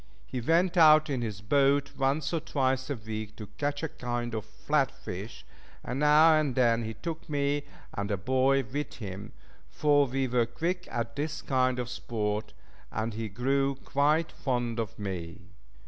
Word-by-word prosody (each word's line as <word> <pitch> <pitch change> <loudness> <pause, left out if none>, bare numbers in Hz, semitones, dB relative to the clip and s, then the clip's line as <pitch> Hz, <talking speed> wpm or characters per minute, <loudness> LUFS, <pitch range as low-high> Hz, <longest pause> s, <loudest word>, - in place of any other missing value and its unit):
He 125 - -4
went 170 +7 +2
out 155 -2 +7
in 130 -3 -1
his 105 -4 -4
boat 140 +5 +2
once 140 +3 0
or 165 - +2
twice 130 -3 0
a 140 - -1
week 110 -1 -6
to 105 - -7
catch 145 +1 -1
a - - +1
kind 120 -3 -4
of 110 -3 -3
flat - - 0
fish, 100 +5 -8 0.4
and 125 +3 -3
now 150 +2 +6
and 150 -5 +1
then 115 -2 +3
he 110 0 -5
took 165 - -6
me 145 0 0 0.3
and 100 +1 -3
a 100 - 0
boy 130 +6 +2
with 145 +5 -4
him, 100 -2 -7 0.4
for 145 -2 +3
we 135 +1 -1
were 120 -1 +2
quick 170 +10 -2
at 115 -1 -3
this 150 +1 -3
kind 130 -1 +1
of 125 -1 -2
sport, 110 -4 -3 0.4
and 110 +1 -2
he 110 0 -4
grew 135 +6 +1
quite 145 +4 +1
fond 120 -4 -2
of 110 -3 -4
me. 90 -2 -6
130 Hz, 175 wpm, -29 LUFS, 115-145 Hz, 0.4 s, out